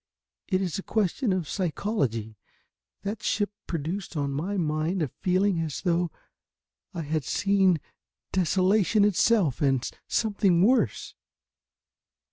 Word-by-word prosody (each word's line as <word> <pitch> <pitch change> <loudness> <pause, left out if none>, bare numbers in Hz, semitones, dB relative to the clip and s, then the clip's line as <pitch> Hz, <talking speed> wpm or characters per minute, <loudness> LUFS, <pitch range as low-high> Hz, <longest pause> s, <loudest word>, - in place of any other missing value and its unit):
It 185 0 +1
is 180 0 -2
a - - -3
question 215 +3 0
of 185 -4 -1
psychology. 145 - -2 0.7
That 205 +2 -4
ship 205 -1 0 0.2
produced 170 +2 -4
on 140 -1 -1
my 175 +9 -2
mind 160 +2 0
a - - 0
feeling 185 +6 +1
as 160 -3 -3
though 175 -1 +1 0.8
I 170 -4 -4
had 155 0 -1
seen 195 -2 +2 0.5
desolation 190 +3 +3
itself, 205 - +2
and 135 -3 +2 0.2
something 200 -5 +2
worse." 225 - +2
185 Hz, 115 wpm, -27 LUFS, 155-200 Hz, 0.8 s, desolation